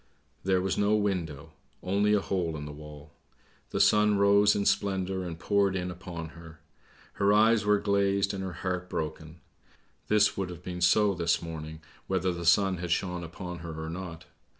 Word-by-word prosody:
There 95 Hz, -1 st, +2 dB
was 95 Hz, -, -1 dB
no 105 Hz, +1 st, +3 dB
window; 85 Hz, -8 st, -2 dB, 0.3 s
only 100 Hz, +3 st, +2 dB
a 105 Hz, -, +3 dB
hole 85 Hz, -5 st, -2 dB
in 75 Hz, -, -6 dB
the 75 Hz, -, -7 dB
wall. 75 Hz, 0 st, -11 dB, 0.6 s
The -, -, -2 dB
sun 105 Hz, +1 st, +4 dB
rose 100 Hz, +1 st, +5 dB
in 100 Hz, -, -1 dB
splendour 95 Hz, -2 st, 0 dB
and 85 Hz, -2 st, -6 dB
poured 100 Hz, +1 st, +1 dB
in 90 Hz, -1 st, -2 dB
upon 85 Hz, -2 st, -7 dB
her; 80 Hz, -1 st, -13 dB, 0.5 s
her 100 Hz, +1 st, +2 dB
eyes 110 Hz, +1 st, +4 dB
were 105 Hz, 0 st, +4 dB
glazed 100 Hz, -1 st, +1 dB
and 95 Hz, -1 st, -4 dB
her 95 Hz, -2 st, -5 dB
heart 90 Hz, 0 st, -2 dB
broken! 80 Hz, +1 st, -5 dB, 0.7 s
This 105 Hz, -1 st, +3 dB
would 95 Hz, -2 st, -3 dB
have 90 Hz, 0 st, -9 dB
been 90 Hz, -1 st, -6 dB
so 100 Hz, +3 st, +4 dB
this 85 Hz, -2 st, +1 dB
morning 80 Hz, -1 st, -7 dB, 0.3 s
whether 95 Hz, -1 st, 0 dB
the 85 Hz, -1 st, -4 dB
sun 95 Hz, +1 st, +4 dB
had 90 Hz, 0 st, -5 dB
shone 90 Hz, 0 st, -1 dB
upon 90 Hz, +1 st, -7 dB
her 80 Hz, -1 st, -7 dB
or 80 Hz, 0 st, -5 dB
not. 85 Hz, -2 st, -7 dB
90 Hz, 180 wpm, -28 LUFS, 85-100 Hz, 0.7 s, rose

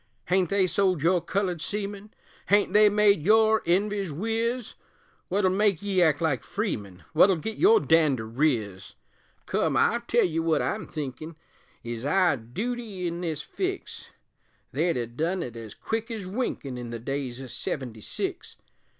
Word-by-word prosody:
Hain't 180 Hz, -2 st, +2 dB
they 195 Hz, -1 st, +3 dB
sold 185 Hz, -3 st, +1 dB
your 175 Hz, +1 st, +3 dB
colored 180 Hz, -1 st, -2 dB
seamen? 205 Hz, +1 st, -5 dB, 0.4 s
Hain't 205 Hz, -1 st, +3 dB
they 210 Hz, 0 st, +7 dB
made 205 Hz, -4 st, +4 dB
your 220 Hz, +4 st, +4 dB
env'ys 195 Hz, 0 st, +1 dB
wiz? 225 Hz, -, -2 dB, 0.6 s
Wut'll 190 Hz, -1 st, +2 dB
make 200 Hz, -2 st, +1 dB
ye 195 Hz, -2 st, +1 dB
act 155 Hz, -4 st, +3 dB
like 150 Hz, -8 st, 0 dB
freemen? 105 Hz, -, -4 dB
Wut'll 185 Hz, +4 st, +6 dB
git 220 Hz, +7 st, -5 dB
your 430 Hz, +5 st, +6 dB
dander 150 Hz, -, +2 dB
riz? 110 Hz, -, -1 dB, 0.5 s
Come, -, -, 0 dB
I'll 235 Hz, -, +3 dB
tell 235 Hz, 0 st, +2 dB
ye 165 Hz, -2 st, -1 dB
wut 165 Hz, -2 st, +2 dB
I'm -, -, -2 dB
thinkin' 155 Hz, +2 st, -6 dB, 0.5 s
Is 120 Hz, 0 st, -5 dB
our 175 Hz, +2 st, +3 dB
dooty 200 Hz, -, -5 dB
in 170 Hz, 0 st, -3 dB
this 160 Hz, -4 st, -3 dB
fix, 380 Hz, 0 st, -4 dB, 0.6 s
They'd 170 Hz, -4 st, 0 dB
ha' 120 Hz, -1 st, -4 dB
done 175 Hz, +6 st, -1 dB
't 120 Hz, -8 st, -6 dB
ez 115 Hz, -3 st, -9 dB
quick 225 Hz, +1 st, -3 dB
ez 220 Hz, -4 st, -5 dB
winkin' 185 Hz, -, -3 dB
In 120 Hz, -1 st, -6 dB
the 115 Hz, -, -4 dB
days 130 Hz, +1 st, -4 dB
o' 135 Hz, -, -7 dB
seventy 125 Hz, -3 st, -5 dB
six. -, -, -4 dB
180 Hz, 160 wpm, -26 LUFS, 140-205 Hz, 0.6 s, they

